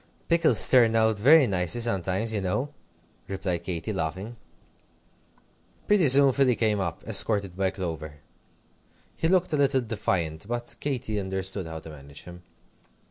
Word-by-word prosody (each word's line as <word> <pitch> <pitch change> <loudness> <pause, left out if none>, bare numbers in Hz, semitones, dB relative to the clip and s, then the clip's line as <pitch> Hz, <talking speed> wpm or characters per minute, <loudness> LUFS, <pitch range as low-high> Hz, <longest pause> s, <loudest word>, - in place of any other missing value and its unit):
"Pickles 165 - +4
turn 115 -3 +4
out 110 -2 +2
very 145 +6 +6
nice 90 -6 0
sometimes, 100 +1 -1
you 105 - -1
know," 130 +11 -2 0.5
replied 95 -3 -3
Katy, 85 +3 -4
laughing. 95 +6 -4 1.5
Pretty 205 -7 +4
soon 135 0 +6
Philly 130 -3 +2
came 110 -3 0
up, 85 -4 -4
escorted 100 -3 -1
by 95 0 0
Clover. 80 -5 -6 1.0
He 160 - 0
looked 180 -1 +1
a - - +2
little 135 -2 +2
defiant, 95 -7 -3
but 120 0 -4
Katy 120 -7 -3
understood 95 -1 -3
how 80 0 -7
to 80 - -11
manage 70 -1 -11
him. 90 0 -12
100 Hz, 140 wpm, -26 LUFS, 90-120 Hz, 1.5 s, very